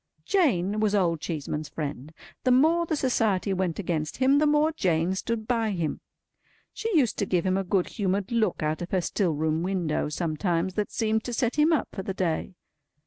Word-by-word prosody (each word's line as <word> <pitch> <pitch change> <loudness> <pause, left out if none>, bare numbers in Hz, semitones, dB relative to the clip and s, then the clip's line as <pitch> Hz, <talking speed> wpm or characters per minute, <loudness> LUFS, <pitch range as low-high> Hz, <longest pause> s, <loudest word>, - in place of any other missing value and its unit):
Jane 215 - +2
was 210 -1 +2
Old 170 -5 +1
Cheeseman's 150 -2 -4
friend. 145 -2 -5 0.3
The 255 - +2
more 320 +7 +4
the 315 - 0
Society 220 -8 +1
went 185 -3 -1
against 160 -5 -2
him, 270 +2 +4
the 305 - +3
more 300 +1 +3
Jane 180 - +1
stood 220 +3 -3
by 230 -3 +1
him. 165 -5 -2 0.7
She 440 -4 -1
used 255 -7 +2
to 200 - 0
give 180 -1 +1
him 185 0 +2
a 195 - 0
good 185 0 +1
humoured 195 0 -2
look 220 -8 +1
out 155 +2 -1
of 175 - -5
her 185 - +1
still 175 -2 0
room 155 +1 0
window, 175 -5 -1
sometimes, 170 +3 -1
that 210 +1 -2
seemed 220 -1 0
to 245 - -4
set 240 0 0
him 300 +2 +4
up 315 - +1
for 195 - -5
the 190 0 -5
day. 180 0 -2
190 Hz, 200 wpm, -26 LUFS, 170-235 Hz, 0.7 s, more